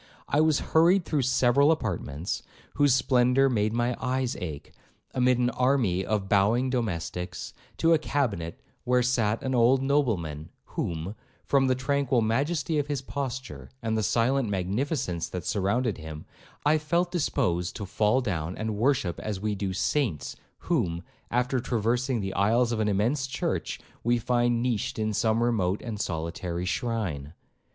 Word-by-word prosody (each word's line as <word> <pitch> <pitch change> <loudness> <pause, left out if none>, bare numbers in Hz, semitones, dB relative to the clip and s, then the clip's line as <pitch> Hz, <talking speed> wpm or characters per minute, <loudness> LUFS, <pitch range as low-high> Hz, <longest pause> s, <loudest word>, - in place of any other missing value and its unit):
I 145 - +2
was 155 -2 +3
hurried 170 +3 +5
through 150 -3 0
several 130 +3 +4
apartments, 80 - -2 0.3
whose 145 -3 +4
splendour 130 +1 +3
made 110 -3 +1
my 120 +1 0
eyes 130 -1 -1
ache, 75 -5 -6 0.4
amid 125 -1 +3
an 125 0 +1
army 125 -9 +1
of 105 -2 -1
bowing 110 +6 +3
domestics, 90 -6 -3 0.2
to 165 0 +4
a 160 - +4
cabinet 100 - -2 0.2
where 125 0 +2
sat 115 -3 +1
an 130 - -1
old 125 +2 +4
nobleman, 100 - 0 0.2
whom, 85 +4 -3 0.3
from 135 -1 +3
the 130 - +3
tranquil 135 -1 +1
majesty 145 +7 0
of 145 - -1
his 145 -3 -2
posture, 130 0 -5
and 110 -1 0
the 110 - +1
silent 115 +3 +1
magnificence 100 - -1
that 90 -3 -5
surrounded 105 +2 0
him, 80 -1 -8 0.4
I 155 +1 +4
felt 170 +4 0
disposed 115 - 0
to 105 - -5
fall 105 +6 +2
down 85 -6 -3
and 110 -1 -3
worship 115 -7 +1
as 105 -3 -4
we 105 +1 -1
do 100 0 -3
those 95 0 -3
saints, 115 - -1 0.3
whom, 85 0 0 0.3
after 125 +2 +1
traversing 120 +1 0
the 95 0 -3
aisles 115 +5 +2
of 115 - -1
an 110 - +1
immense 120 +8 +1
church, 135 +1 -2 0.2
we 120 +1 +3
find 120 0 +1
niched 120 -5 -1
in 110 -1 -1
some 110 +2 +2
remote 105 -5 0
and 110 -4 -4
solitary 85 +1 -3
shrine. 90 - -2
120 Hz, 155 wpm, -27 LUFS, 95-130 Hz, 0.4 s, hurried